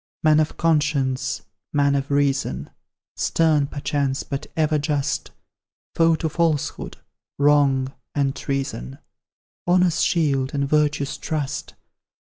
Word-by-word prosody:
Man 155 -1 +5
of 155 - 0
conscience 140 -7 +1 0.3
man 140 -1 +3
of 140 0 -1
reason; 140 -1 0 0.4
Stern, 155 -3 +2
perchance, 140 -2 -1
but 140 - -5
ever 155 -1 +2
just; 145 -1 -1 0.6
Foe 165 0 +4
to 160 - -2
falsehood, 160 -2 -1 0.4
wrong, 140 -2 +3 0.2
and 140 -2 +1
treason, 135 - -4 0.7
Honour's 180 -1 +3
shield, 140 -5 +1
and 140 -1 0
virtue's 145 -1 +1
trust! 150 -4 -3
145 Hz, 110 wpm, -23 LUFS, 135-155 Hz, 0.7 s, Man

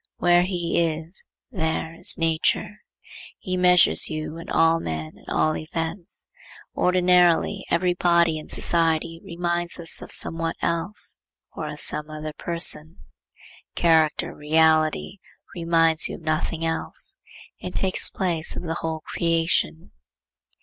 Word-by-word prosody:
Where 175 0 +4
he 175 -2 -1
is, 165 +2 -3 0.2
there 160 -4 -2
is 165 - +4
nature. 165 +5 0 0.6
He 185 -3 -4
measures 180 -2 +5
you 155 0 -5
and 165 - -9
all 165 0 +3
men 80 - -5
and - - -20
all 155 0 +1
events. 165 +4 -3 0.5
Ordinarily, 180 +1 +3
every 180 +1 +2
body 170 -2 +2
in 155 - -11
society 165 0 +1
reminds 175 -2 -2
us 170 -2 -2
of - - -9
somewhat 165 0 -1
else, 170 - -3 0.4
or - - -5
of - - -7
some 150 0 0
other 155 0 -6
person. 165 -2 0 0.8
Character, 160 -2 +2
reality, 160 +4 +2 0.3
reminds 165 -2 +2
you - - -5
of - - -12
nothing 160 +1 -2
else; 165 0 -4 0.4
it 180 - -7
takes 190 -1 +2
place 175 -4 -1
of - - -5
the 165 -1 -3
whole 160 -1 -3
creation. 165 - -1
165 Hz, 130 wpm, -24 LUFS, 160-175 Hz, 0.8 s, measures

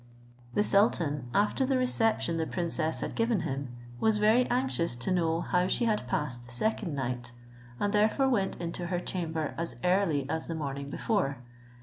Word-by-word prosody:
The 205 - +4
sultan, 170 - +2
after 210 - +2
the 265 0 +2
reception 225 -8 +2
the 160 -1 -1
princess 170 -2 -1
had - - -3
given 230 -4 +1
him, 140 -4 -3 0.3
was 220 -1 +3
very 220 +4 +4
anxious 245 - +1
to 125 +9 -2
know 165 -2 +1
how 180 0 +1
she 235 - +1
had 210 - 0
passed 125 -3 -2
the - - -10
second 170 - -1
night, 125 -2 -3 0.5
and 205 0 0
therefore 215 +6 +3
went 205 -7 0
into 170 0 -4
her 175 0 -1
chamber 165 -4 -3
as 170 - -2
early 180 -7 +2
as 160 +2 -2
the 165 - -3
morning 140 -2 -4
before. 165 - 0
170 Hz, 170 wpm, -29 LUFS, 145-210 Hz, 0.5 s, The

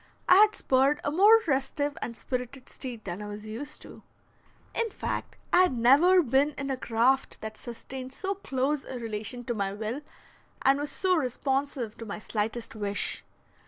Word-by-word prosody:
I 365 - +8
had 425 +1 +6
spurred 270 +3 +2
a 290 - 0
more 415 +7 +7
restive 285 0 0
and 235 -1 -4
spirited 255 +1 -5
steed 240 -4 -7
than 180 +1 -5
I 210 - -6
was 205 +1 -7
used 230 +7 -7
to. - - -12 0.7
In 465 -1 0
fact, - - -4 0.2
I 360 - +7
had 360 -9 +2
never 310 +10 +6
been 275 +3 +2
in 275 -1 -3
a - - 0
craft 250 +2 +1
that 220 0 -6
sustained 255 +3 -8
so 380 +8 -3
close 280 -6 -1
a 260 - -6
relation 225 +1 -5
to 240 - -2
my 200 -3 -1
will, 220 +7 -4 0.6
and 275 +1 +4
was 290 0 -3
so 370 +3 +2
responsive 265 -3 -1
to 230 - -6
my 200 - -4
slightest 220 +2 -3
wish. 205 -2 -2
260 Hz, 175 wpm, -28 LUFS, 225-290 Hz, 0.7 s, I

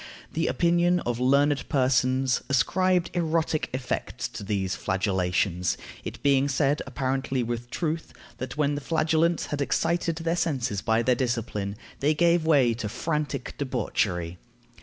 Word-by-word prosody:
The 165 +1 0
opinion 175 +1 +3
of 120 -1 -2
learned 140 +2 +2
persons 130 -1 +2
ascribed 180 +6 +2
erotic 165 -2 0
effects 130 -1 -3
to - - -8
these 95 -2 -1
flagellations, 95 -1 0 0.3
it - - -7
being 140 -1 +4
said, 140 +2 +1
apparently 130 -1 -1
with 120 +1 -4
truth, 165 +3 -3 0.3
that 130 +2 -5
when 145 -1 +2
the 145 - -3
flagellants 160 +2 +1
had 145 -1 -2
excited 170 +3 0
their 165 +1 -1
senses 135 - -1
by 110 +1 +2
their 125 - +3
discipline, 115 -5 -2 0.2
they 150 +2 +2
gave 170 0 +3
way 135 -7 +5
to 110 -2 -4
frantic 150 +5 -2
debauchery. 95 -10 -1
135 Hz, 140 wpm, -26 LUFS, 120-160 Hz, 0.3 s, way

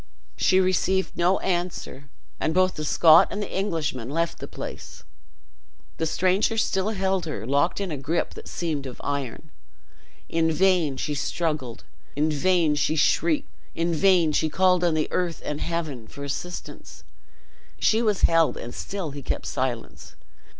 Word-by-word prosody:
She 185 - +3
received 190 0 +1
no 180 +2 +3
answer, 175 -6 -3 0.3
and 160 - -1
both 185 0 +3
the 155 - -5
Scot 155 +1 +6
and 205 - -4
the 205 - -4
Englishman 160 - -2
left 165 +3 -1
the - - -6
place. - - -8 0.9
The 160 - 0
stranger 185 +7 +1
still 195 -2 +1
held 190 -4 -1
her 110 -9 -4
locked 140 - +1
in 195 -3 -3
a 150 - -3
gripe 155 +5 -2
that - - -10
seemed 155 -5 -3
of 125 - -9
iron. 140 +2 -4 0.8
In 165 0 +1
vain 170 -5 +2
she 150 - -2
struggled, 145 -4 -2 0.3
in 150 +2 +1
vain 165 +1 +2
she 150 +1 +1
shrieked, 160 0 +2 0.2
in 170 +1 0
vain 170 -1 +4
she 155 +1 +1
called 180 +2 +3
on 170 -2 +2
earth 175 -2 -1
and 150 0 -3
Heaven, 155 -9 -3
for 140 - -9
assistance; 175 +5 -6 0.7
she 220 +1 +3
was 210 -4 +1
held, 165 -1 +4
and 120 - -7
still 190 -6 -5
he 140 0 -7
kept - - -3
silence. 125 -3 -4
165 Hz, 155 wpm, -25 LUFS, 145-185 Hz, 0.9 s, Scot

